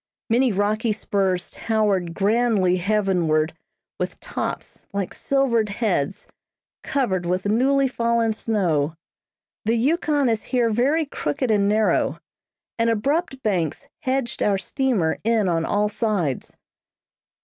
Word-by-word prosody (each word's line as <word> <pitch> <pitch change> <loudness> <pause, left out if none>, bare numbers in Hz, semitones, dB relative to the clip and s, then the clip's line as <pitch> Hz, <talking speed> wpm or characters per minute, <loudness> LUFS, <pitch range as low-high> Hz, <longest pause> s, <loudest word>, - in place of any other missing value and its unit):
Many 245 +2 +3
rocky 210 +3 +1
spurs 195 -4 -1
towered 200 -6 0
grandly 205 -3 +2
heavenward, 180 -6 +1 0.5
with - - -3
tops, - - -5
like 200 -2 -2
silvered 245 -6 +1
heads, 200 -7 -1 0.6
covered 215 -10 0
with 180 +2 -1
newly 265 +6 +3
fallen 235 -2 +1
snow. 170 -9 0 0.7
The 225 +2 +2
Yukon 290 +2 +1
is 225 -2 +1
here 240 -3 +1
very 280 +8 +2
crooked 230 - -2
and 200 -1 +3
narrow, 215 +1 +2 0.6
and 230 0 +3
abrupt 270 +5 -1
banks 185 - -1
hedged 260 -2 -2
our 200 -1 +2
steamer 210 - 0
in 225 -2 +2
on 165 -2 +1
all 210 +1 +1
sides. 205 - -2
215 Hz, 115 wpm, -23 LUFS, 190-240 Hz, 0.7 s, Many